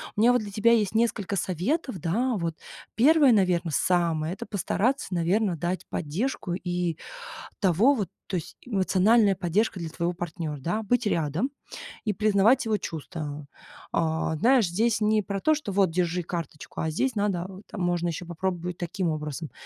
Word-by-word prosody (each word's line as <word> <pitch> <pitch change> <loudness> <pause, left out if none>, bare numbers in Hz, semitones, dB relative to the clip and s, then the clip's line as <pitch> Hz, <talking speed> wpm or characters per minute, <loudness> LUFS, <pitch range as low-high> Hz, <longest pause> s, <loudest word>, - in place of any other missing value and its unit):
У 210 - 0
меня 240 +2 +6
вот 245 - +2
для 205 -1 -7
тебя 215 +3 +3
есть 215 -3 +2
несколько 220 -4 +1
советов, 195 - -1
да. 230 - 0
Вот 165 -2 -2 0.4
первое, 285 +2 +6
наверно, 180 -5 +2
самое 165 -1 +1
это 190 - -7
постараться, 210 +4 -1
наверное, 180 +3 +1
дать 175 +3 -3
поддержку 180 - -2
и 175 -2 -2 0.6
того 200 - +4
вот, 205 -8 -2 0.2
то - - -3
есть 165 - -7
эмоциональная 200 0 +3
поддержка 190 +3 0
для 165 -2 -4
твоего 170 +2 -2
партнёра, 165 -3 -5
да, 175 +11 -1
быть 245 +3 +1
рядом 170 - 0 0.6
и 210 - +1
признавать 215 +5 +3
его 220 -1 +1
чувства. 150 -4 -6 0.5
А, 160 -1 0
знаешь, 240 - +4
здесь 215 +5 +1
не 215 0 +3
про 195 0 -3
то, 310 - +4
что 295 -9 -5
вот: 190 -3 +3
"Держи 175 +1 0
карточку", 165 -3 -6
а 160 - 0
здесь 255 +12 0
надо, 200 -4 0
вот 195 +2 -11
там 205 - -6
можно 175 -1 0
ещё 170 +1 -4
попробовать 175 0 -3
таким 175 +1 -2
образом 155 0 -4
185 Hz, 170 wpm, -26 LUFS, 170-215 Hz, 0.6 s, меня